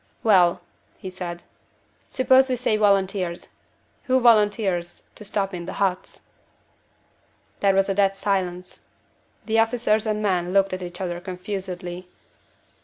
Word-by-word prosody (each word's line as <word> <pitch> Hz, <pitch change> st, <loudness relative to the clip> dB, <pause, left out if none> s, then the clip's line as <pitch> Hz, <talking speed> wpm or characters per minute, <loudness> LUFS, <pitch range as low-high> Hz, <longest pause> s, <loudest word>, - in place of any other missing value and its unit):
"Well," 185 Hz, -6 st, +4 dB, 0.4 s
he 185 Hz, -, -8 dB
said, 175 Hz, -2 st, -7 dB, 0.6 s
"suppose 260 Hz, 0 st, +3 dB
we 255 Hz, -, +1 dB
say 240 Hz, -3 st, 0 dB
volunteers. 195 Hz, -4 st, 0 dB, 0.6 s
Who 260 Hz, -1 st, +3 dB
volunteers 205 Hz, -6 st, +2 dB
to -, -, -10 dB
stop 200 Hz, -1 st, -1 dB
in 175 Hz, -1 st, -6 dB
the -, -, -5 dB
huts?" 190 Hz, -2 st, -2 dB, 1.4 s
There 195 Hz, -1 st, +2 dB
was 195 Hz, 0 st, +3 dB
a 195 Hz, -, 0 dB
dead 195 Hz, 0 st, +2 dB
silence. 185 Hz, -2 st, -3 dB, 0.7 s
The 225 Hz, 0 st, +1 dB
officers 225 Hz, -1 st, +1 dB
and 215 Hz, 0 st, -1 dB
men 180 Hz, -3 st, 0 dB
looked 195 Hz, -1 st, +2 dB
at 185 Hz, -, -4 dB
each 175 Hz, +1 st, -7 dB
other 175 Hz, -2 st, -3 dB
confusedly. 180 Hz, -1 st, -6 dB
195 Hz, 130 wpm, -23 LUFS, 180-215 Hz, 1.4 s, Well